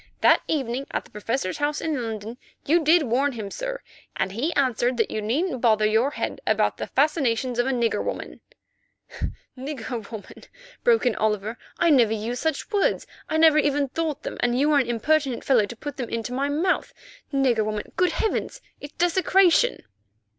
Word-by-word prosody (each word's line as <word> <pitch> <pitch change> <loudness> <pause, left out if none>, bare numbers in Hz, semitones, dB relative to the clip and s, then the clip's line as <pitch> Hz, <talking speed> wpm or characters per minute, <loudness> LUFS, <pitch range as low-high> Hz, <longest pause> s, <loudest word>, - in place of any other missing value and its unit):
That - - +5
evening 270 -3 -2
at - - -3
the - - -19
Professor's 210 -2 -3
house 290 +1 0
in 305 -5 -2
London 225 +1 -6 0.3
you 330 +3 +3
did 320 +2 +5
warn 270 +3 +1
him, 210 -4 -6
sir, - - -5 0.3
and - - -1
he 250 - -1
answered 250 -2 +1
that 225 - 0
you 215 - -2
needn't 255 - -1
bother 215 -3 +3
your 220 +5 +3
head 290 - -4
about - - +2
the - - -4
fascinations 260 -5 +1
of 245 - +2
a - - +1
nigger 235 -3 0
woman——" - - -5 1.1
"Nigger 255 -5 -6
woman," 220 -3 -10 0.4
broke 465 - +3
out 245 - +2
Oliver; 215 +1 -1 0.2
"I 335 - +3
never 235 -6 +4
used 225 +3 -3
such 320 - -2
words; 405 -2 +1 0.2
I 315 - 0
never 315 -1 +6
even 290 -1 +1
thought 315 +1 -3
them, - - -5
and 245 0 +1
you 295 +2 +3
are 290 - +5
an 255 - 0
impertinent 270 +2 +1
fellow 235 -7 +3
to 235 - -8
put 290 +4 -7
them 245 -4 -4
into 230 +1 -3
my 275 +2 0
mouth. 330 +6 0 0.4
Nigger 260 -6 +2
woman! 215 0 -4
Good 360 -2 +2
heavens! 445 +2 -2 0.2
It's 290 +1 -9
desecration." 370 +5 +3
265 Hz, 180 wpm, -24 LUFS, 230-310 Hz, 1.1 s, never